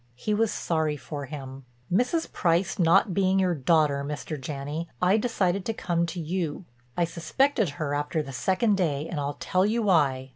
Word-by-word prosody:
He 210 - -2
was 220 +1 +2
sorry 160 -3 -1
for 145 +1 -6
him: 135 -2 -8 0.3
"Mrs. 250 - +1
Price 180 +3 +1
not 180 +3 +4
being 190 0 +2
your 185 -2 +2
daughter, 150 -1 +2
Mr. 150 +2 -4
Janney, 145 +4 -5
I 180 +2 +4
decided 200 -5 0
to 225 - -2
come 170 -3 0
to 170 +1 -5
you. 170 0 -3 0.3
I 175 - +3
suspected 175 - +1
her 145 -2 -2
after 145 +2 -1
the 135 -2 -8
second 195 - +1
day 155 -5 0
and 165 - -4
I'll 145 0 -3
tell 185 0 +1
you 225 +3 +1
why. 140 -9 +2
170 Hz, 180 wpm, -26 LUFS, 145-195 Hz, 0.3 s, not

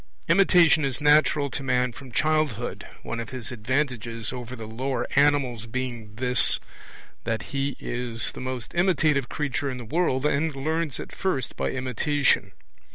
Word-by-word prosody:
Imitation 170 -2 +5
is 135 0 -1
natural 150 -1 +4
to 135 - -2
man 125 -2 +1
from 130 +1 -11
childhood, 155 -4 0 0.2
one 115 - -4
of 115 - -5
his 130 -3 -5
advantages 120 -1 -2
over 125 0 -6
the 115 -2 -8
lower 130 +5 -2
animals 135 -5 +2
being 120 -3 -5
this, 125 +1 +3 0.6
that 110 -2 -2
he 140 0 -1
is 120 -3 -1
the - - -9
most 130 -3 -4
imitative 160 -7 +2
creature 145 -2 -2
in 130 - -4
the 120 - -8
world, 140 0 0
and 150 +1 +1
learns 155 +1 -2
at - - -8
first 160 -10 -1
by - - -1
imitation. 130 +2 +1
130 Hz, 155 wpm, -25 LUFS, 120-150 Hz, 0.6 s, Imitation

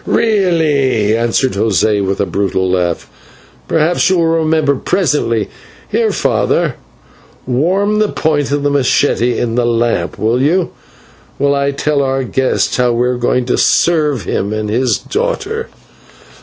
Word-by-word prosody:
"Really," 155 - +1
answered 120 +3 0
José 105 0 +1
with 95 0 -2
a 100 - +1
brutal 95 0 -1
laugh, 90 -2 -1 0.6
"perhaps 165 +4 +1
you 185 - +2
will 170 - +2
remember 155 -2 +1
presently. 140 - 0 0.4
Here, - - +1
father, - - 0 0.7
warm 185 +11 +1
the 215 -1 +2
point 145 -3 -1
of 145 0 -1
the 145 - +1
/machete/ 140 -1 +1 0.2
in 115 -2 -1
the 120 0 +1
lamp, 120 0 -1
will 115 +4 0
you, 170 +6 +1 0.7
while 140 0 +1
I 140 0 0
tell 140 +1 0
our 135 0 -1
guest 130 +1 0
how 125 -1 +2
we 120 +1 +1
are 125 - 0
going 125 +1 0
to 125 - 0
serve 150 - +2
him 100 +4 -2
and 110 -1 -3
his 120 -1 +1
daughter." 450 0 -3
135 Hz, 145 wpm, -14 LUFS, 115-160 Hz, 0.7 s, you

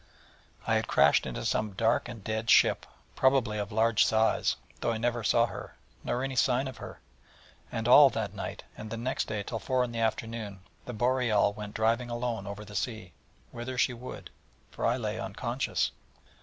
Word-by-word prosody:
I - - +1
had - - -2
crashed - - +4
into 65 - -5
some 105 -2 0
dark 115 +4 +1
and 115 -4 -9
dead 110 +1 -3
ship, - - +5 0.3
probably 130 -5 +2
of 100 -1 -4
large 110 +1 +3
size, 110 0 +2 0.2
though 115 - 0
I 115 - -1
never 120 0 -1
saw 115 +3 +4
her, - - -8 0.3
nor 125 - -1
any 135 -1 -3
sign 130 +1 +2
of 130 - -8
her; - - -10 0.7
and 115 0 -2
all 140 +3 +9
that 110 -5 -3
night, 100 - -6
and 110 - -8
the 115 - -4
next 125 +3 -2
day 105 -2 -3
till 115 +2 -4
four 130 +1 +1
in 125 - -3
the 115 - -4
afternoon, 110 -3 -2 0.2
the 125 - -6
Boreal 120 -3 +2
went 105 0 -8
driving 115 +3 +1
alone 120 -4 -3
over 100 +1 -7
the 105 0 -11
sea, 110 -2 -4 0.4
whither 120 +2 -6
she 130 0 +2
would: 125 +1 -9 0.4
for - - -1
I 120 +2 +2
lay 110 -2 -3
unconscious. 120 +3 -2
115 Hz, 185 wpm, -29 LUFS, 105-125 Hz, 0.7 s, all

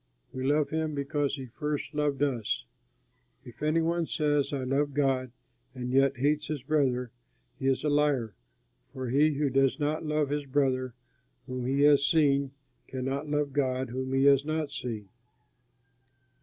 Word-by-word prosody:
We 130 - -4
love 145 +2 +2
him 160 -1 -1
because 140 0 -1
he 135 -2 -7
first 150 +3 -4
loved 145 -2 0
us. 125 -7 -1 0.8
If 120 +1 -13
any 155 +2 +2
one 170 0 0
says, 145 -3 +1
"I 140 -2 -2
love 140 +2 0
God," 135 -3 +1 0.4
and 125 -1 -4
yet 135 0 +3
hates 150 +3 +1
his 150 -5 -4
brother, 130 -5 +1 0.5
he 135 - -1
is 135 -1 +1
a - - 0
liar; 145 -7 +1 0.6
for 130 -2 -4
he 150 +4 +3
who 140 -1 0
does 135 +2 +2
not 150 +2 -1
love 150 -2 0
his 145 -1 -2
brother 130 -3 0 0.5
whom 125 -1 -4
he 135 +2 +1
has 145 -1 +6
seen, 140 -3 +3 0.4
cannot 135 +3 -3
love 145 -2 0
God 130 -2 0
whom 130 +1 -3
he 135 0 +3
has 140 -1 +6
not 155 -1 -2
seen. 115 -7 -5
140 Hz, 160 wpm, -29 LUFS, 130-150 Hz, 0.8 s, has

